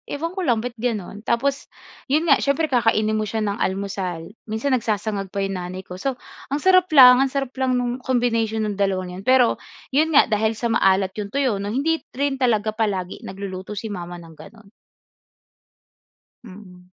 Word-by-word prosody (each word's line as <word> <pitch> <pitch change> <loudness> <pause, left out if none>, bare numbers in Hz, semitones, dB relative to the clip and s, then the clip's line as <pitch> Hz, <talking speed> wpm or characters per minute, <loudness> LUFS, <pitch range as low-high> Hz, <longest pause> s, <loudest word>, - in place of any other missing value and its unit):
Ewan 330 +4 -3
ko 380 - -3
lang 240 -7 +2
ba't 245 -1 -5
gano'n, 210 -3 -3
tapos 275 +4 0 0.4
'yon 300 +4 +2
nga 275 - +5
siyempre 285 +2 0
kakainin 215 -3 +2
mo 215 - -2
siya 220 +1 -2
ng 205 0 -2
almusal. 190 -3 -3 0.2
Minsan 220 +6 -2
nagsasangag 210 -4 -1
pa 200 0 -1
'yong 195 -1 -2
nanay 185 +1 -6
ko. 180 0 -10
So 270 +2 -2 0.3
ang 285 +2 -3
sarap 370 -1 +5
lang 250 -1 +9
ang 270 - +3
sarap 270 -2 -2
lang 260 -1 +1
nung 245 0 -1
combination 230 -4 0
ng 205 -1 -3
dalawa 190 -2 +1
na 180 +1 -8
'yon 195 - -12
pero, 255 -2 +4 0.3
'yon 305 +4 +3
nga - - +8
dahil 220 +1 +1
sa 235 +1 -2
maalat 195 -3 +3
'yong 200 0 -5
tuyo 255 -8 +1
'no, 200 - -4
hindi 290 +9 0 0.2
rin 275 0 -1
talaga 220 -4 +1
palagi 200 -5 -2
nagluluto 190 +1 -7
si 210 +1 -5
mama 175 -2 -6
ng 165 -1 -13
gano'n. 220 -3 -15 1.7
Mm. 185 -3 -13
220 Hz, 185 wpm, -22 LUFS, 195-260 Hz, 1.7 s, lang